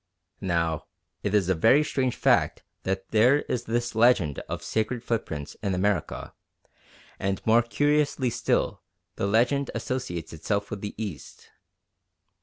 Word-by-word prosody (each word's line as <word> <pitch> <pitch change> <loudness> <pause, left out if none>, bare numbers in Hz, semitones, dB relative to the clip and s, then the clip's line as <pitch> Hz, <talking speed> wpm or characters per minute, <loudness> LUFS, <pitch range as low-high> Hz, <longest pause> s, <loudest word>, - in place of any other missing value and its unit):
Now 85 -4 -1 0.3
it 100 0 0
is 100 -4 +3
a 95 - +3
very 115 - +5
strange 130 -4 -1
fact - - +2 0.2
that 95 0 -2
there 125 +7 +4
is 120 -1 -3
this 120 +1 -1
legend 110 - +3
of - - -4
sacred 115 +2 -1
footprints 80 -12 -3
in 100 -3 0
America, 95 -2 -1 0.9
and 95 0 -1
more 115 +1 +5
curiously 145 +1 +1
still, 125 +1 0 0.4
the 100 - 0
legend 120 +6 +2
associates 90 -12 -4
itself 100 +6 -2
with 105 - -5
the 105 - -5
East. 100 -8 -7
110 Hz, 135 wpm, -26 LUFS, 95-125 Hz, 0.9 s, very